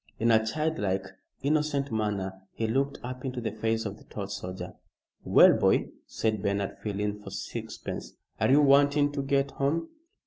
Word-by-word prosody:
In 115 +1 +3
a 110 -1 +5
child 155 +7 -1
like, 95 -1 0 0.4
innocent 145 -1 +1
manner 105 -3 -1 0.2
he 115 - -1
looked 135 +5 0
up 125 +1 -6
into 130 -2 -3
the 115 -2 -2
face 110 +1 -1
of 100 0 -4
the - - -16
tall 100 - -5
soldier. 95 -2 -6 0.5
"Well, - - +7
boy," - - +2 0.2
said 110 -2 -1
Bernard, 100 -1 -1
feeling 105 0 -3
for - - -9
sixpence, - - -6 0.3
"Are - - +2
you 140 +3 +6
wanting 145 +1 +5
to 145 -1 -2
get 140 0 +1
home?" 150 +5 -1
115 Hz, 170 wpm, -28 LUFS, 105-140 Hz, 0.5 s, Well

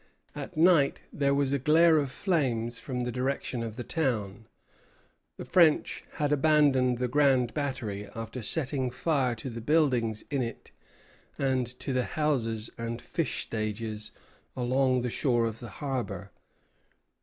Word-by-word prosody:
At - - -7
night 160 -4 +4
there 140 -1 +2
was 140 -1 +1
a 140 - +1
glare 160 +3 +5
of 140 -2 -1
flames 125 - 0
from 125 -2 -4
the 120 - -2
direction 125 -1 -2
of 115 -2 -5
the 125 - -5
town. 110 -8 -2 0.9
The - - -7
French 165 -4 +3
had 150 -2 -1
abandoned 140 -4 +3
the 125 +1 0
Grand 130 -2 +3
Battery 120 -9 -3
after 115 +2 -5
setting 135 +1 -1
fire 130 -2 0
to 115 +3 -7
the 115 -2 -5
buildings 125 -6 +2
in 140 -2 +1
it 115 -2 -6 0.7
and 130 -2 +1
to 135 - -2
the 125 -1 +1
houses 115 -8 0
and 115 0 -3
fish 165 +5 -2
stages 110 -1 -4 0.5
along 130 +1 +2
the 125 -1 -2
shore 120 -4 +1
of 115 -1 -4
the 120 - -8
harbor. 105 -6 -4
130 Hz, 145 wpm, -29 LUFS, 115-145 Hz, 0.9 s, glare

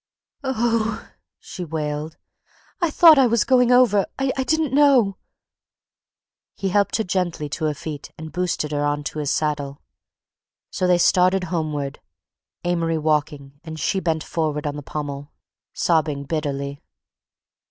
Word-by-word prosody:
"Oh!" 230 -4 -1 0.3
she 180 - -8
wailed. 155 -1 -4 0.6
"I 340 - +2
thought 315 -1 +7
I 260 - +5
was 235 -2 +2
going 250 -2 +3
over. 245 -6 +4
I 270 -1 0
didn't 295 +3 0
know—" 270 -9 +4 1.4
He 195 - -2
helped 200 +2 +1
her 220 - +1
gently 180 -5 -2
to 155 +2 -3
her 150 -1 0
feet 145 -1 -7
and 160 0 -8
boosted 175 -3 -2
her 145 -1 -1
onto 145 +1 -2
his 145 -2 -2
saddle. 145 -4 -2 0.9
So 185 - 0
they 180 -1 +4
started 185 +1 +3
homeward; 150 -4 -2 0.6
Amory 170 -2 0
walking 150 -2 -1
and 160 -1 -8
she 190 +6 0
bent 160 -4 -1
forward 155 -2 -2
on 145 -1 -2
the 145 - -6
pommel, 145 0 -6 0.4
sobbing 155 -4 0
bitterly. 140 -2 -3
160 Hz, 135 wpm, -22 LUFS, 150-205 Hz, 1.4 s, thought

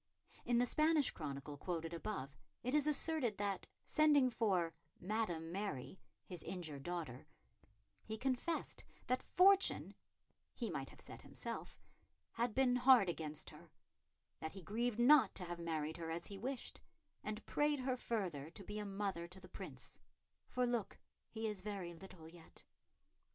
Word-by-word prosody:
In 240 - +3
the 245 - +5
Spanish 305 +1 +4
chronicle 145 -1 -5
quoted 165 0 -3
above, 165 -6 -4 0.3
it 250 +2 -1
is 300 -1 +4
asserted 300 -6 +2
that, 200 -1 -1 0.2
sending 295 -5 +5
for 190 -7 +2 0.3
"Madam 175 -5 -1
Mary," 185 -6 -3 0.3
his 180 -4 -6
injured 160 -7 -4
daughter, 155 -5 -4 0.8
he 220 - -4
confessed 265 +7 -1 0.2
that 255 +1 +1
fortune 390 +2 +5 0.6
he - - -2
might - - -3
have - - -13
said - - -8
himself - - -5 0.5
had 235 -1 -1
been 255 -2 +4
hard 250 -6 +7
against 155 -3 -3
her, 160 +2 -14 0.7
that 160 - -4
he 190 -2 -9
grieved 225 +5 0
not 245 -2 +7
to 180 - -3
have 175 0 -5
married 160 -2 -2
her 165 -1 -4
as 165 +1 -3
he 200 - -5
wished, 255 +3 -4 0.4
and 215 +1 -4
prayed 295 -2 +2
her 255 0 +1
further 185 - -2
to 195 +4 -6
be 210 +3 -5
a 210 - -3
mother 195 -4 -2
to 180 +2 -11
the - - -12
Prince, - - -8 0.5
"for 250 0 +1
look, 240 -4 -1 0.3
he 220 0 -2
is 210 -3 -3
very 195 -4 -4
little 170 -2 -11
yet." 165 0 -15
200 Hz, 155 wpm, -39 LUFS, 170-245 Hz, 0.8 s, hard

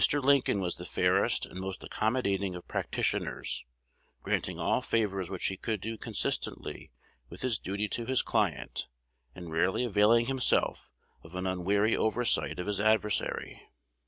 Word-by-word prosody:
Lincoln 140 -7 +3
was 90 -2 -1
the - - -7
fairest - - +2
and 95 - -9
most 95 0 -5
accommodating 100 -5 0
of 90 - -9
practitioners, - - -2 0.6
granting - - -1
all - - +1
favors 100 -5 0
which 95 -2 -3
he 95 - 0
could 110 +1 -2
do 115 +4 -4
consistently - - -3 0.4
with 85 - -10
his 120 -4 0
duty 100 +2 -2
to 115 +2 -3
his 130 -1 +3
client, 60 - 0 0.5
and 85 -2 -8
rarely 90 +8 +2
availing 115 +2 +4
himself 130 0 +1 0.3
of 80 +2 -12
an 90 +1 -2
unwary 100 +4 +2
oversight 115 +2 +1
of 90 - -2
his 105 -1 -2
adversary. 105 -1 +1
105 Hz, 145 wpm, -30 LUFS, 95-115 Hz, 0.6 s, availing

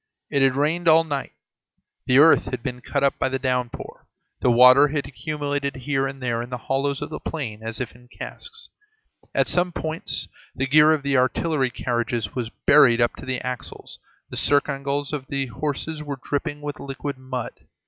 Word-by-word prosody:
It 140 - +2
had 135 -1 +4
rained 160 +5 0
all 165 0 +7
night, 145 -4 -4 0.7
the 130 - +4
earth 160 +3 +7
had 125 -2 -5
been 125 -2 -4
cut 140 +2 -2
up 140 - +2
by 130 - +1
the 135 - -1
downpour, 125 -2 -3 0.3
the - - +2
water 125 +4 +8
had 145 0 -2
accumulated 145 0 -3
here 135 +1 -1
and 135 0 -7
there 120 -2 0
in 120 - -7
the 125 - -4
hollows 135 +3 -1
of 145 - -7
the - - -5
plain 115 -10 -5
as 115 0 -4
if 125 - -4
in 125 0 -18
casks; 460 - -9 0.7
at - - +3
some 180 0 +1
points 160 -1 -3 0.3
the 130 - -1
gear 150 +3 +6
of 155 -3 +1
the 140 -1 +2
artillery 130 +2 +1
carriages 120 -2 -2
was 120 -3 -3 0.2
buried 130 -5 +6
up 120 0 +2
to - - -10
the 130 -1 -2
axles, 125 -2 -6 0.3
the - - -5
circingles 140 0 0
of 135 -3 -4
the 140 -1 -2
horses 150 +4 -3
were 145 -2 -5
dripping 145 +1 -2
with 145 -1 -5
liquid 140 0 -5
mud. 130 -2 -4
135 Hz, 190 wpm, -23 LUFS, 125-145 Hz, 0.7 s, water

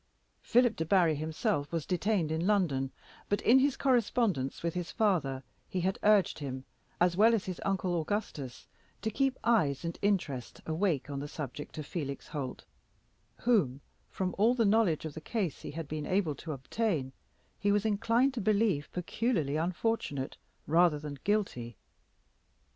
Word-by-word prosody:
Philip 245 -1 +3
Debarry 165 0 +3
himself 155 - -1
was 165 -3 -2
detained 180 -3 0
in 160 +3 0
London, 160 -11 +2 0.4
but 205 - +2
in 255 +3 +6
his 275 0 +2
correspondence 230 - +1
with 170 -1 0
his 180 -1 -3
father 145 -11 +1 0.3
he 185 - -1
had 190 +2 0
urged 205 -5 +4
him, 130 -2 -5 0.3
as 175 0 +3
well 225 +4 +6
as 215 - -2
his 185 -2 -5
uncle 185 -3 0
Augustus, 155 - -4 0.4
to 220 - 0
keep 270 +3 +1
eyes 170 - +2
and 165 - -4
interest 175 -11 -1
awake 160 -4 0
on 140 - -3
the 145 - -4
subject 145 0 -7
of 155 - -4
Felix 140 -4 -5
Holt, 140 -4 -5 0.8
whom, 185 - +2 0.3
from 185 -1 -2
all 230 +4 +5
the 230 -3 +2
knowledge 200 -7 +3
of 155 - -5
the 160 - -7
case 195 - -2
he - - -6
had 160 0 -5
been 150 0 -4
able 185 -5 +1
to 155 +3 -7
obtain, 145 - -2 0.5
he 205 - +2
was 205 +1 +2
inclined 230 +5 +2
to 240 - -3
believe 200 -7 +2
peculiarly 180 - -1
unfortunate 170 -4 -1 0.3
rather 165 0 +4
than 145 -2 -7
guilty. 125 - -1
175 Hz, 160 wpm, -31 LUFS, 145-215 Hz, 0.8 s, in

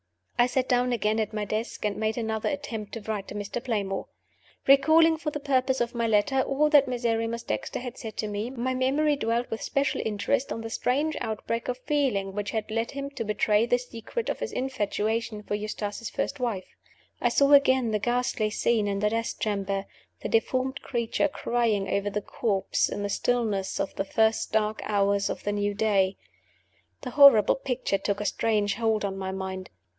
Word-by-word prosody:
I 240 - +6
sat 255 0 0
down 250 0 +2
again 220 -2 +1
at 215 0 -2
my 210 -1 -2
desk, 215 +2 -3
and 205 -1 0
made 220 +1 -1
another 220 -2 -1
attempt 235 -8 -5
to 230 - -5
write 210 -2 -4
to - - -8
Mr. 205 +4 -4
Playmore. 200 -5 -2 0.6
Recalling, 315 +4 +6
for 310 -1 -3
the 295 - -4
purpose 265 -2 +1
of 240 0 -1
my 235 -1 0
letter, 225 +5 +3
all 275 +3 +2
that 290 -3 +6
Miserrimus 235 -2 -1
Dexter - - -3
had 245 -1 -6
said 220 -2 -7
to 215 - -1
me, 210 +3 -3
my 255 0 -2
memory 280 +4 +2
dwelt 235 -2 -1
with 225 - -3
special 280 -1 0
interest 220 +6 -1
on 225 - -3
the 225 0 -6
strange 290 +7 0
outbreak 225 +1 -3
of 250 - -2
feeling 255 -9 0
which 205 +1 -3
had 220 -1 -3
led 225 +1 -1
him 280 0 -5
to 270 -5 -4
betray 210 +1 +2
the 245 - +3
secret 245 - -5
of - - -2
his - - -3
infatuation 220 -3 -2
for 205 - -4
Eustace's 210 +1 -4
first 285 - -3
wife. 225 -7 -3 0.5
I - - +3
saw 280 0 +3
again 260 -4 +5
the 210 - +1
ghastly 240 -1 0
scene 215 0 +1
in 200 -1 -1
the 210 +1 +1
death 230 0 -2
chamber 200 -2 -1 0.4
the - - -3
deformed 255 +4 0
creature 235 +3 0
crying 235 -7 0
over 200 +1 0
the 210 0 -3
corpse 195 -5 0
in 205 - -4
the 205 - -2
stillness 215 -4 0
of - - -2
the 195 - -2
first 220 +2 +1
dark 215 0 0
hours 200 -1 +1
of - - -4
the 205 - -1
new 205 0 -1
day. 200 -3 +2 0.8
The 250 - -5
horrible 275 -6 +7
picture 250 -7 -2
took 200 +1 -1
a 210 - -3
strange 210 -2 +1
hold 220 -2 0
on 195 -1 -3
my 190 -1 -4
mind. 190 -1 -5
225 Hz, 195 wpm, -27 LUFS, 205-255 Hz, 0.8 s, horrible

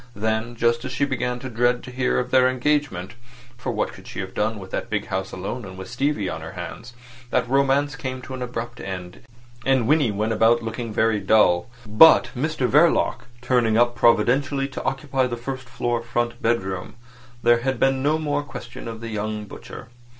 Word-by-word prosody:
Then 110 +2 -1
just 115 0 +1
as - - -5
she 140 +2 +1
began 125 -3 -2
to 130 - -5
dread 120 0 +1
to 125 - -9
hear 125 0 0
of 125 0 -1
their 130 -1 +5
engagement 130 -7 -1 0.4
(for 125 - -4
what - - -2
could - - -13
she - - -7
have 95 0 -7
done 110 +1 -1
with 95 -2 -10
that - - -3
big 105 -1 -1
house 95 -1 -2
alone, 95 0 -6
with 95 +3 -8
Stevie 130 -5 0
on 80 -2 -4
her 80 - -8
hands), 120 +1 -8 0.4
that 125 -1 +1
romance 140 +2 +2
came 130 -2 -5
to 130 - -8
an 130 - -6
abrupt 120 -1 -5
end, 90 -2 -7 0.4
and 130 -3 +2
Winnie 145 -3 +4
went 105 +2 -1
about 115 +2 +3
looking 115 +1 -4
very 110 0 +2
dull. 100 -1 +3 0.2
But 110 +10 +7
Mr 140 0 0
Verloc, 145 -6 +3 0.2
turning 120 -3 +2
up 120 0 +4
providentially 135 +5 +3
to 135 - -6
occupy 135 -1 0
the 120 -1 -4
first 130 +1 -6
floor 120 -1 -1
front 120 0 -2
bedroom, 95 -4 -1 0.5
there 120 0 +5
had 130 0 -2
been 135 0 +2
no 150 +3 +2
more 145 -2 -1
question 120 -5 -9
of 115 -1 -7
the 115 - -5
young 105 0 -3
butcher. - - -10
120 Hz, 195 wpm, -23 LUFS, 110-130 Hz, 0.5 s, But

